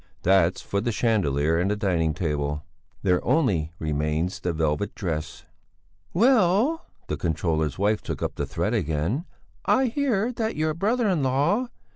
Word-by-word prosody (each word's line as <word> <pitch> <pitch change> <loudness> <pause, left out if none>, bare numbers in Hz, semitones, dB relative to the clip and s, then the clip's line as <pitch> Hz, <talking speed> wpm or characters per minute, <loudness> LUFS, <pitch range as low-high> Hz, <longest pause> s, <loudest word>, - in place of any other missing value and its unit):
That's 95 -1 +3
for 100 - -1
the 120 +2 -1
chandelier 80 - +1
and 90 +3 +1
the 105 - +1
dining 85 -7 0
table. 75 -2 -2 0.4
There 90 -3 +2
only 95 - +1
remains 75 +3 -1
the 90 - -1
velvet 80 +4 -1
dress. 80 -2 -4 0.7
"Well," 230 - +3 0.2
the - - -3
controller's 80 -3 -1
wife 105 +2 +1
took - - -4
up - - -1
the - - -3
thread 105 - -1
again, 90 - -1 0.4
"I 265 - +3
hear 245 -3 0
that 225 -1 -2
your 155 0 0
brother 220 +8 +1
in 180 -6 +1
law...." 145 - +1
100 Hz, 150 wpm, -25 LUFS, -, 0.7 s, That's